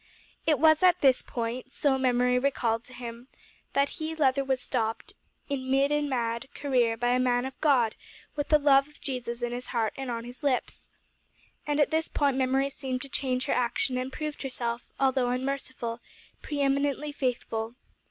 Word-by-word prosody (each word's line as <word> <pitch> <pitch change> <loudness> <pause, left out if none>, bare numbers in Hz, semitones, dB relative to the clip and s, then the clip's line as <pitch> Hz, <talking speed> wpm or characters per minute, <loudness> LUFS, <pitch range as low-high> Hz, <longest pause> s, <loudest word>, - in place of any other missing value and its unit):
It 305 -2 +4
was 315 +1 +5
at 360 -1 +5
this 265 -2 +5
point 240 +2 -4
so 280 -1 +2
Memory 250 -1 +2
recalled 240 -4 0
to 255 - -13
him 240 0 -8 0.5
that 280 0 +3
he, 315 +1 -2
Leather, 275 -3 +3
was 265 -1 0
stopped, 230 -3 -2 0.3
in 260 -2 -3
mid 275 +2 +3
and 295 -1 +1
mad, 235 +1 -2
career, 245 -5 +1
by 245 +1 +1
a 250 +1 +3
man 245 0 +2
of 265 - -8
God 255 -8 +4 0.4
with 290 -1 -2
the 305 - +7
love 280 -1 +5
of 300 - -21
Jesus 245 -3 -4
in 240 - -1
his 245 +1 -4
heart 225 -3 0
and 270 -1 -5
on 230 -1 -3
his 245 +3 -10
lips. 275 -4 -1 0.8
And 295 0 +1
at 295 - +3
this 320 +1 +1
point 280 -2 +1
Memory 265 +1 +1
seemed 260 -2 -4
to 275 - -7
change 255 -1 -1
her - - +1
action 250 +1 0
and 255 +1 -2
proved 305 +1 -5
herself, 240 -3 -3
although 260 -2 +2
unmerciful, 255 -2 -3 0.4
pre 290 -2 -3
eminently 280 +1 +1
faithful. 235 -4 -2
260 Hz, 180 wpm, -28 LUFS, 245-280 Hz, 0.8 s, the